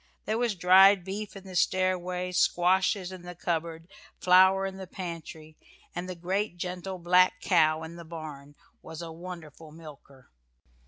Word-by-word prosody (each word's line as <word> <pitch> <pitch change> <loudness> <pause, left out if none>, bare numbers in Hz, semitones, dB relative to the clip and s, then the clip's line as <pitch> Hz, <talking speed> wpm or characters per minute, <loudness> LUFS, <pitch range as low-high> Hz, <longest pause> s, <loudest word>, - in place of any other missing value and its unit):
There 220 +2 -1
was 240 -4 0
dried 190 +2 +6
beef 200 +3 -6
in 195 - -10
the 190 -1 -10
stairway, 180 0 0
squashes 185 +1 +2
in 185 -1 -9
the 175 0 -9
cupboard, 165 -1 -3 0.3
flour 190 +1 +5
in 190 0 -5
the 190 -1 -8
pantry, 165 -3 -8 0.3
and 175 +1 -5
the 185 - -5
great 185 +2 -2
gentle 180 +1 -5
black 180 +1 +3
cow 160 -3 +2
in 165 +1 -9
the 170 - -9
barn 155 -3 -9 0.3
was 160 +1 -9
a 165 - -7
wonderful 165 -2 -10
milker. 145 -4 -14
180 Hz, 155 wpm, -28 LUFS, 165-185 Hz, 0.3 s, dried